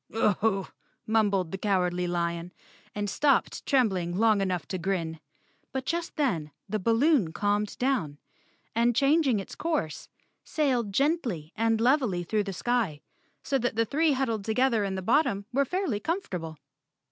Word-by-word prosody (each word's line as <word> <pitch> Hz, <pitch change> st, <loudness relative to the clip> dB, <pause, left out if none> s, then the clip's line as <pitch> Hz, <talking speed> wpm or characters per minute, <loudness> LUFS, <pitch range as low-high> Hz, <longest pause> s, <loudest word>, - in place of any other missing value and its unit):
"Aho!" 210 Hz, -2 st, +1 dB, 0.4 s
mumbled 200 Hz, -6 st, +1 dB
the 195 Hz, -, -4 dB
Cowardly 180 Hz, -3 st, +1 dB
Lion, 170 Hz, 0 st, -2 dB, 0.4 s
and 205 Hz, 0 st, -2 dB
stopped 280 Hz, +8 st, +1 dB
trembling 190 Hz, -, +1 dB
long 215 Hz, -2 st, +4 dB
enough 180 Hz, -5 st, -1 dB
to 185 Hz, -, -3 dB
grin. 165 Hz, -3 st, -2 dB, 0.5 s
But 265 Hz, -1 st, -3 dB
just 340 Hz, +2 st, -2 dB
then 180 Hz, -, 0 dB, 0.2 s
the 215 Hz, +2 st, -2 dB
balloon 230 Hz, -, +3 dB
calmed 205 Hz, +2 st, 0 dB
down, 225 Hz, -, 0 dB, 0.6 s
and 235 Hz, +1 st, +2 dB
changing 275 Hz, -4 st, +3 dB
its 195 Hz, -, -8 dB
course 300 Hz, -, -3 dB, 0.3 s
sailed 255 Hz, -9 st, 0 dB
gently 235 Hz, -, 0 dB
and 225 Hz, 0 st, +1 dB
levelly 240 Hz, -7 st, +2 dB
through 210 Hz, +4 st, 0 dB
the 195 Hz, -, -3 dB
sky, 205 Hz, -7 st, -1 dB, 0.4 s
so 275 Hz, -2 st, 0 dB
that 245 Hz, -2 st, -1 dB
the 230 Hz, +1 st, +2 dB
three 300 Hz, +6 st, +2 dB
huddled 230 Hz, -6 st, -1 dB
together 230 Hz, 0 st, +2 dB
in 195 Hz, -1 st, -2 dB
the 190 Hz, -, -4 dB
bottom 215 Hz, -4 st, +2 dB
were 280 Hz, +2 st, +3 dB
fairly 360 Hz, -, -1 dB
com¬ 335 Hz, -, -1 dB
fortable. 165 Hz, -, -6 dB
215 Hz, 150 wpm, -28 LUFS, 185-265 Hz, 0.6 s, long